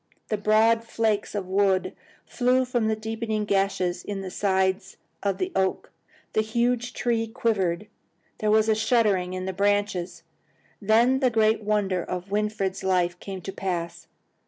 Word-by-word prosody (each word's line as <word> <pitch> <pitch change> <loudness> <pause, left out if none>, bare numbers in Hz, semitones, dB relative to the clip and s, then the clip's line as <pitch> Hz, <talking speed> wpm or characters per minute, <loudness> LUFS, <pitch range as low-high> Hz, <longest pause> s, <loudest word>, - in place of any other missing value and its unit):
The 215 - 0
broad 220 +2 +3
flakes 220 -3 -1
of 200 -2 -2
wood 190 0 +1 0.3
flew 255 +1 +2
from 240 -3 0
the 220 - +1
deepening 220 0 -3
gashes 195 -3 0
in 200 -1 -4
the 190 -1 -6
sides 190 0 0 0.2
of 200 -1 -1
the 370 0 -2
oak. 190 0 0 0.4
The 215 - +3
huge 240 +2 0
trunk 225 -1 -1
quivered. 195 -6 0 0.5
There 215 - 0
was 215 0 +4
a 220 - +4
shuddering 215 -5 +1
in 185 0 -4
the 190 - -3
branches. 200 -3 0 0.6
Then 230 +5 +4
the 260 -2 +3
great 220 -1 +2
wonder 205 -3 0
of 180 +2 -6
Winfried's 205 -2 -1
life 180 -2 +1
came 190 -2 -7
to 195 - -6
pass. 170 -3 -4
205 Hz, 155 wpm, -25 LUFS, 190-225 Hz, 0.6 s, was